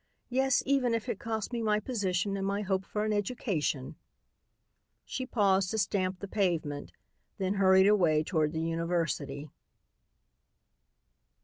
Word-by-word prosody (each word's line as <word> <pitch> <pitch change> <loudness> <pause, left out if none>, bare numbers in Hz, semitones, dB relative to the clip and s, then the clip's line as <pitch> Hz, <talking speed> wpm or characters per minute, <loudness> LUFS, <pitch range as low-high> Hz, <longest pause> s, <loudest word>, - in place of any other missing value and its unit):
Yes, 265 +1 +2
even 265 -4 +2
if 230 +2 -3
it 230 -5 -3
costs 220 -1 -3
me 235 - -1
my 210 -1 +2
position 200 -4 -1
and 195 0 -2
my 200 +1 -1
hope 190 -1 -1
for 210 0 -2
an 215 - 0
education!" 190 - -2 1.1
She 260 -1 -4
paused 195 -5 +2
to 220 - -2
stamp 190 -2 0
the 200 - -5
pavement, 170 -8 -1 0.5
then 190 -1 0
hurried 190 -1 +5
away 175 -7 +4
toward 155 -3 0
the 160 0 -2
university. 165 -4 -2
195 Hz, 135 wpm, -30 LUFS, 170-215 Hz, 1.1 s, hurried